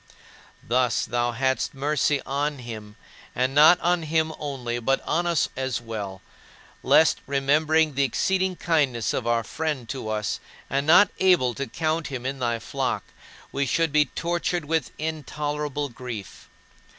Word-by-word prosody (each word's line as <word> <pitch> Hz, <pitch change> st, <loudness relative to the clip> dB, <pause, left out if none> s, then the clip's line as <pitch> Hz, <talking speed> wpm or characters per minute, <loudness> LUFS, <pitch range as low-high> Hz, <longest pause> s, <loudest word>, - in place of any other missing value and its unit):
Thus 125 Hz, +1 st, +2 dB
thou 120 Hz, 0 st, -1 dB
hadst 130 Hz, +3 st, 0 dB
mercy 145 Hz, 0 st, +1 dB
on 145 Hz, +2 st, -1 dB
him, 110 Hz, -4 st, -8 dB, 0.4 s
and 130 Hz, +2 st, 0 dB
not 155 Hz, +5 st, +7 dB
on 175 Hz, 0 st, +2 dB
him 160 Hz, 0 st, 0 dB
only, 125 Hz, -5 st, -3 dB
but 135 Hz, +3 st, +1 dB
on 175 Hz, +1 st, 0 dB
us 170 Hz, -3 st, +2 dB
as 130 Hz, -1 st, -2 dB
well; 105 Hz, -5 st, -6 dB, 0.6 s
lest, 160 Hz, -, +4 dB
remembering 150 Hz, +3 st, +2 dB
the 140 Hz, -, 0 dB
exceeding 185 Hz, +7 st, +1 dB
kindness 140 Hz, -, +1 dB
of 120 Hz, -, -2 dB
our 115 Hz, -1 st, +2 dB
friend 145 Hz, -2 st, -3 dB
to 130 Hz, -5 st, -4 dB
us 105 Hz, -6 st, -2 dB, 0.3 s
and 140 Hz, +2 st, 0 dB
not 180 Hz, +5 st, +7 dB
able 175 Hz, -10 st, +4 dB
to 140 Hz, +3 st, -4 dB
count 160 Hz, +5 st, -1 dB
him 130 Hz, -3 st, -6 dB
in 135 Hz, +1 st, -3 dB
thy 120 Hz, -2 st, 0 dB
flock, 115 Hz, -, -2 dB, 0.5 s
we 140 Hz, 0 st, -1 dB
should 165 Hz, +4 st, +1 dB
be 150 Hz, 0 st, +4 dB
tortured 170 Hz, +2 st, -2 dB
with 160 Hz, +1 st, 0 dB
intolerable 150 Hz, -1 st, -3 dB
grief. 120 Hz, -4 st, -8 dB
140 Hz, 150 wpm, -25 LUFS, 120-160 Hz, 0.6 s, not